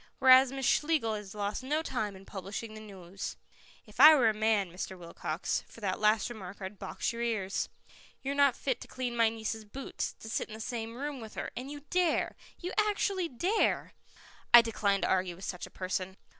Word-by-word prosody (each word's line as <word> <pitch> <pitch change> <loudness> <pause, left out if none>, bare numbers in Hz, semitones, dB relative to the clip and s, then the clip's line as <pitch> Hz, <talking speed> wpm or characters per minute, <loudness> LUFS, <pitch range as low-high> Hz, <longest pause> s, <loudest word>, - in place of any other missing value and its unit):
"Whereas 260 0 +7
Miss 270 -1 -3
Schlegel 295 -8 +2
has 210 -1 -6
lost 205 +2 -2
no 300 +5 -1
time 215 -9 -2
in 190 +1 -13
publishing 200 +4 -6
the 215 - -8
news." 195 -2 -7 0.5
"If 210 +2 -16
I 305 +3 +11
were 245 -6 +4
a - - +1
man, 215 -4 +1
Mr. 185 +1 -6
Wilcox, 170 -1 -3
for - - -14
that 190 -3 -1
last 215 0 +3
remark 200 -6 -8
I'd 190 +1 -7
box - - -3
your 235 - -5
ears. 215 -5 -1 0.5
You're 275 +1 -1
not 280 -3 +4
fit 260 -3 -2
to - - -9
clean 250 -2 -4
my 230 -1 +4
niece's 220 0 -4
boots, 260 +6 -5
to - - -12
sit 220 - -2
in 215 - -8
the - - -9
same 225 0 -4
room 280 0 -4
with 220 -1 -10
her, - - -4
and 255 +3 -5
you 290 0 -7
dare 355 -3 +2 0.2
you 360 +1 -5
actually 400 -3 +1
dare 355 - +1 0.6
I 240 0 +10
decline 205 -3 +1
to - - +1
argue 185 -2 +1
with 190 +3 -9
such 180 - -5
a - - -15
person." 185 0 -3
225 Hz, 205 wpm, -31 LUFS, 200-265 Hz, 0.6 s, I